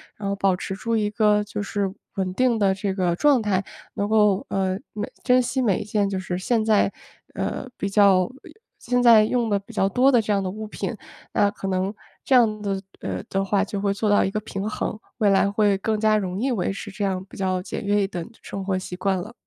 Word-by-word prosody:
然 205 - -5
后 200 - 0
保 195 -1 +2
持 190 +1 -5
住 230 +4 -2
一 210 -2 +1
个 210 -1 +3
就 210 0 -5
是 200 -1 -2 0.2
稳 185 -2 -2
定 250 +2 +2
的 200 -3 +3
这 190 0 -2
个 180 -3 +1
状 285 -1 +4
态。 200 -3 0 0.3
能 200 - -1
够， 210 -2 +3
呃， 190 -1 0 0.2
每 210 - -4
珍 255 0 +4
惜 255 +2 -1
每 210 -7 +2
一 - - -4
件 205 -1 0
就 195 - -2
是 185 -1 -3
现 220 +4 0
在， 215 -2 +3 0.4
呃， - - -3
比 200 - -2
较 195 -2 +4 0.5
现 245 0 0
在 225 -3 +7
用 235 0 0
得 200 -1 +2
比 200 +4 -15
较 195 -2 +2
多 250 +7 +4
的 245 -4 +4
这 215 - -2
样 200 -1 +2
的 190 - -2
物 215 +3 -6
品。 210 - -4 0.4
那 205 - +3
可 195 - -6
能 190 +1 -1 0.3
这 265 - +3
样 215 -4 +4
的 195 -2 -2 0.2
呃 - - -4
的 195 0 0
话， 195 0 +1
就 200 0 -4
会 200 -1 +1
做 210 +1 -1
到 205 - +4
一 - - 0
个 215 - -1
平 200 -1 -5
衡， 215 0 -3 0.2
未 215 -3 +3
来 195 0 +3
会 205 -1 +2
更 215 +2 -1
加 215 0 +3
容 190 -2 -3
易 260 +4 0
维 200 -5 0
持 200 +1 -7
这 205 - -4
样 190 -2 -1
比 - - -12
较 185 -1 0
简 185 - -5
约 205 0 +2
一 - - 0
等 175 -4 -5
的 - - -15
生 195 - -6
活 190 -1 0
习 185 -1 -6
惯 190 +1 0
了。 210 +6 -8
200 Hz, 260 characters per minute, -24 LUFS, 195-215 Hz, 0.5 s, 在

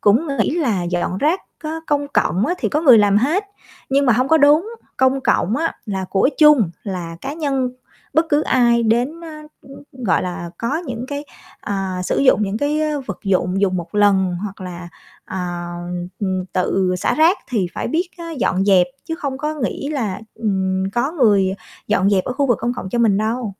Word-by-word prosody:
cũng 230 +11 +3
nghĩ - - +2
là 225 - 0
dọn 175 +1 -2
rác 320 +6 +1 0.2
có 315 +1 -4
công 285 -1 0
cộng 200 - +1
á, 355 - 0
thì - - -1
có 300 - 0
người 255 -8 +7
làm 205 -1 +4
hết, 305 - +1 0.5
nhưng 275 0 +3
mà 240 - +5
hông 255 +4 +1
có 320 - +5
đúng. 305 +8 +4 0.3
Công 260 +1 +2
cộng 220 -3 +1
á 330 +2 0
là 190 -3 -3
của 195 +7 +3
chung, 295 - +6
là 175 -4 -5
cá 275 +2 -5
nhân 275 -5 -1 0.4
bất 320 +3 +3
cứ 295 0 +2
ai 235 -2 +3
đến, 245 +9 0
ơ, 335 - -9 0.6
gọi 245 -8 0
là, 175 -1 -5
có 275 +7 -1
những 245 -1 -4
cái, 285 0 -4 0.4
à, 190 -2 -3
sử - - 0
dụng 255 -5 +4
những 200 +1 -1
cái 295 +3 0 0.3
vật 200 - -5
dụng 185 0 +1
dùng 185 -2 +1
1 175 +3 -6
lần 195 -3 +3
hoặc 200 -2 -7
là, 175 -1 -7 0.4
à, 175 -2 -4 0.5
ừm, 185 -2 -1
tự 185 0 +1
xả - - 0
rác 325 +5 +4
thì 215 -8 0
phải - - -3
biết 340 +3 0
á 335 -1 -7
dọn 195 -9 0
dẹp 190 -3 +5 0.2
chứ 325 - -3
không 280 -6 -4
có 300 +2 -2
nghĩ 280 0 -3
là, 235 -12 -2
ừm, 190 -3 -1
có 265 +6 0
người 205 - +3 0.3
dọn 195 - +2
dẹp 190 -2 +2
ở - - -2
khu 280 +2 0
vực 240 - +2
công 240 - 0
cộng 190 - -5
cho 240 - -1
mình 220 -4 +3
đâu. 225 +3 -1
235 Hz, 200 wpm, -19 LUFS, 190-285 Hz, 0.6 s, người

